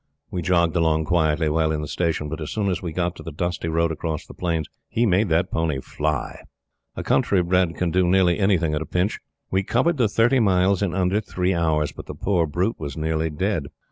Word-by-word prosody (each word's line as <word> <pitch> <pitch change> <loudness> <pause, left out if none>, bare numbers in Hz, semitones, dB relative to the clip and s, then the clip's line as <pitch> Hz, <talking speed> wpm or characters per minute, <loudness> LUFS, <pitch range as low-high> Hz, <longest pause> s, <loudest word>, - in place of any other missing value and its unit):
We 90 - -2
jogged 85 0 +2
along 80 -2 +2
quietly 80 -2 +2
while 80 +1 +1
in 75 -1 -1
the - - -5
station; 80 -1 -1
but 80 +2 -5
as 75 - -4
soon 100 -3 -1
as 90 - -2
we 85 - -4
got 90 +2 -1
to - - -9
the 80 - -7
dusty 85 +2 -3
road 80 0 +1
across 80 -1 -4
the - - -12
plains, 85 -3 -2 0.2
he 120 +1 +1
made 100 0 +2
that 85 +3 +1
pony 80 -4 0
fly. 75 0 -3 0.6
A - - -4
country 95 -3 +2
bred 90 -1 +1
can 90 -2 -1
do 90 0 +2
nearly 90 -1 +3
anything 90 -6 +2
at 75 - -1
a 80 - -5
pinch. 90 +3 0 0.3
We 95 - +2
covered 135 - +1
the 115 -5 +2
thirty 120 +5 +3
miles 95 -2 +3
in 95 -4 -1
under 95 +2 +1
three 90 -2 -1
hours, 80 -3 +1
but - - -11
the - - -7
poor 90 -5 +1
brute 90 +9 -1
was 70 -3 -6
nearly 80 0 -1
dead. 80 -1 -1
85 Hz, 225 wpm, -23 LUFS, 80-95 Hz, 0.6 s, nearly